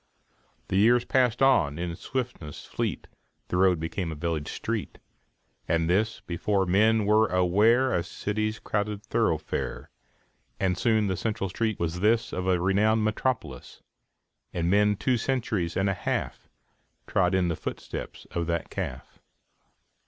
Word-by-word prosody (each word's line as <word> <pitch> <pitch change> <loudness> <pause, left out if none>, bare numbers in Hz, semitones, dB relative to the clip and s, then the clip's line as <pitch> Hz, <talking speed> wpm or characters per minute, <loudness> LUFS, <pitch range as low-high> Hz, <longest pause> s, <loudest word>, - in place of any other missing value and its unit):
The 95 - +1
years 120 +4 +4
passed 125 -1 +2
on 85 - +4
in 85 -1 -3
swiftness 120 - -5
fleet, - - -3 0.4
The 90 - 0
road 90 -2 +4
became 80 +2 -3
a - - -5
village 80 -1 -3
street, - - -4 0.7
And 80 0 +1
this, 105 +6 +1
before 95 +3 0
men 105 +4 +3
were 110 +1 +4
aware, 105 +8 +3
A - - +2
cityŌĆÖs 110 +5 -3
crowded 105 0 -2
thoroughfare; - - -2 0.7
And 95 -2 +1
soon 110 +2 +2
the 95 -1 0
central 105 -1 -2
street 110 +1 -1
was 85 +1 -2
this 110 +4 +2
Of 90 0 -3
a 90 -1 +3
renowned 105 +4 +2
metropolis; 110 - -3 0.7
And 85 0 -1
men 105 +1 +4
two 125 +5 +1
centuries 115 -9 -1
and 95 +1 +2
a 100 - +2
half 90 - -3 0.6
Trod 90 0 +2
in 90 -2 +2
the 85 - -1
footsteps - - -6
of 85 -1 -2
that 85 -1 -2
calf. - - -6
100 Hz, 145 wpm, -27 LUFS, 85-110 Hz, 0.7 s, years